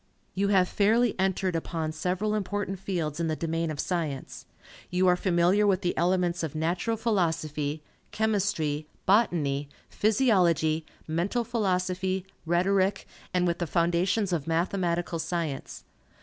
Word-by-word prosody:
You 200 +1 +1
have 190 -2 +4
fairly 220 +5 +3
entered 190 -1 0
upon 160 -1 -2
several 180 +6 -1
important 205 -2 -2
fields 170 -6 -3
in 165 - 0
the 155 - 0
domain 165 0 -2
of 150 -2 -5
science. 155 -7 -3 0.4
You 180 +1 +1
are 180 - +5
familiar 180 +3 +3
with 195 -2 +2
the 175 - -1
elements 180 0 +1
of 160 -2 -4
Natural 175 +8 -1
Philosophy, 160 -8 -1 0.3
Chemistry, 190 -9 0 0.2
Botany, 150 -9 +2 0.2
Physiology, 180 - +2 0.2
Mental 175 +9 0
Philosophy, 190 -4 -1 0.2
Rhetoric, 190 +3 +2 0.3
and 180 -1 +1
with 170 -1 0
the 175 - -1
foundations 180 +4 +1
of 160 -3 -2
Mathematical 170 0 0
Science. 165 -5 -3
180 Hz, 130 wpm, -27 LUFS, 165-195 Hz, 0.4 s, are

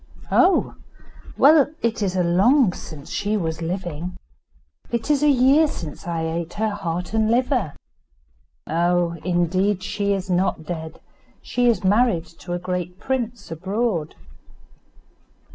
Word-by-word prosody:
"Oh! 365 +1 +3 0.6
well, 290 0 +6
it 230 -1 0
is 190 -2 0
long 190 +6 +4
since 150 -5 -10
she 210 +1 -1
was 160 -3 -3
living. 175 0 -4 0.7
It 235 +5 -1
is 290 -2 +2
a 300 - +4
year 275 +4 +5
since 165 - -7
I 165 -1 -2
ate 165 +1 -3
her 220 0 -1
heart 180 -2 -4
and 220 -1 +2
liver." 245 - +1 0.9
"Oh! 170 +1 +1
indeed 185 +3 +1
she 200 +1 -1
is 190 -2 -3
not 180 -3 0
dead. 160 -2 -6 0.4
She 245 0 0
is 225 -6 +2
married 200 -3 +3
to 175 - -6
a - - 0
great 180 0 -4
prince 240 -5 -3
abroad." 190 -1 -2
185 Hz, 130 wpm, -22 LUFS, 170-230 Hz, 0.9 s, well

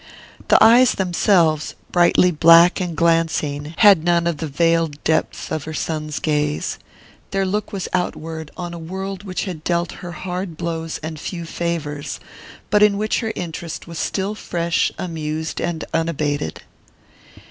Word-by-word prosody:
The - - +6
eyes 240 +2 +7
themselves, 175 -4 +2 0.2
brightly 175 +1 +4
black 170 +3 +6
and 175 -3 -3
glancing, 160 -2 0
had 200 -7 +6
none 170 0 +2
of 170 -3 0
the 160 - -4
veiled 165 0 +1
depths 160 0 -1
of 155 -2 -3
her 160 0 -6
son's 155 -2 -3
gaze. 150 -1 -1 0.5
Their 195 -1 0
look 205 +2 -2
was 195 -3 -4
outward, 160 -3 -3
on 175 -1 -5
a 170 - -7
world 190 +3 -5
which 185 -3 -3
had 170 -5 -6
dealt 170 0 0
her 175 -2 -7
hard 180 -1 -5
blows 165 -1 -3
and 160 -1 -5
few 170 +2 -5
favours, 160 -4 -4 0.5
but 210 0 +4
in 210 -1 +5
which 215 +1 0
her 225 -2 -2
interest 170 -2 -6
was 170 -1 -7
still 195 +1 -1
fresh, 170 -5 -1
amused 160 -2 -4
and 170 -2 -2
unabated. 150 - -1
170 Hz, 150 wpm, -21 LUFS, 160-180 Hz, 0.5 s, eyes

